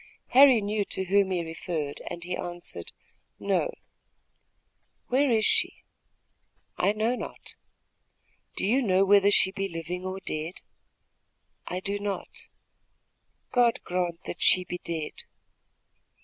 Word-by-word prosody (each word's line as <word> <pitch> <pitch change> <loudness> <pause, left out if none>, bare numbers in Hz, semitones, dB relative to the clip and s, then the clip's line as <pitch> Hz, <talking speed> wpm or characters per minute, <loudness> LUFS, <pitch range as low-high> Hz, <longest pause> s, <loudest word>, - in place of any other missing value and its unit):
Harry 260 -3 +7
knew 205 +1 0
to 190 - -3
whom 195 +1 +3
he 180 -2 0
referred, 160 -2 -4
and 170 - -6
he 180 0 -3
answered: 175 - -6 0.5
"No." - - +1 1.4
"Where 275 +3 +3
is 220 -3 +3
she?" - - +1 0.9
"I 195 - +2
know 215 +3 0
not." - - -7 1.0
"Do - - -1
you 245 +7 +3
know 195 -4 +3
whether 200 0 +6
she 195 -2 +4
be 195 0 -3
living 170 +2 -5
or 185 +1 -4
dead?" 160 -1 -5 1.1
"I 180 +1 -3
do 200 +1 -3
not." 200 -1 -5 1.0
"God 240 -2 +3
grant 175 -1 -2
that 175 - -7
she 185 - +5
be 180 0 -6
dead!" 160 -3 -5
190 Hz, 125 wpm, -27 LUFS, 175-205 Hz, 1.4 s, Harry